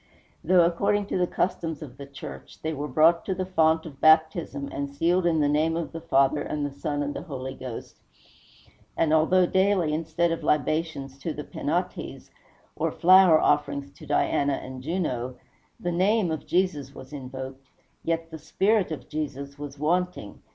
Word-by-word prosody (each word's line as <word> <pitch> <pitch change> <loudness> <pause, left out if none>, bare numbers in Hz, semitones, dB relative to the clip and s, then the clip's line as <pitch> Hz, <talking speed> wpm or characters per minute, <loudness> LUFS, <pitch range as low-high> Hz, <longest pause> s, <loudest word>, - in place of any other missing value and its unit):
Though, 175 0 +5
according 200 +4 +1
to - - 0
the 180 - +2
customs 165 -5 -2
of 130 -4 -11
the 140 -1 -9
church, 140 -1 -10
they 160 0 -1
were 145 0 -4
brought 160 +5 +4
to 190 - -1
the 185 0 -2
font 160 -3 +2
of 140 -4 -11
baptism, 155 -2 +3
and 140 0 -3
sealed 170 +5 +1
in 160 -2 +2
the 145 - +3
name 155 +3 +1
of 170 - -4
the 165 - -7
Father, 140 -2 +2
and 145 0 -2
the 145 - -3
Son, 145 +1 -3
and 145 0 -4
Holy 130 -5 -5
Ghost, 130 -3 -8 1.0
and 160 -1 +2
although 180 +4 +4
daily, 190 -4 +2
instead 165 +2 0
of 165 - -2
libations 150 -2 -1
to 160 +3 -3
the 150 - -5
Penates, 175 +6 -4 0.4
or - - -1
flower 185 -2 +6
offerings 140 -1 +1
to 155 - -14
Diana 145 0 +1
and 130 -1 -6
Juno, 130 -6 -2 0.4
the 175 - -2
name 190 +1 +2
of 160 - -4
Jesus 155 -7 0
was 130 +2 -11
invoked, 130 0 -7 0.4
yet 165 0 -2
the 160 - -7
spirit 195 +5 +1
of 155 - -6
Jesus 140 -2 -5
was 145 -1 -7
wanting. 170 - -1
155 Hz, 170 wpm, -26 LUFS, 140-170 Hz, 1.0 s, flower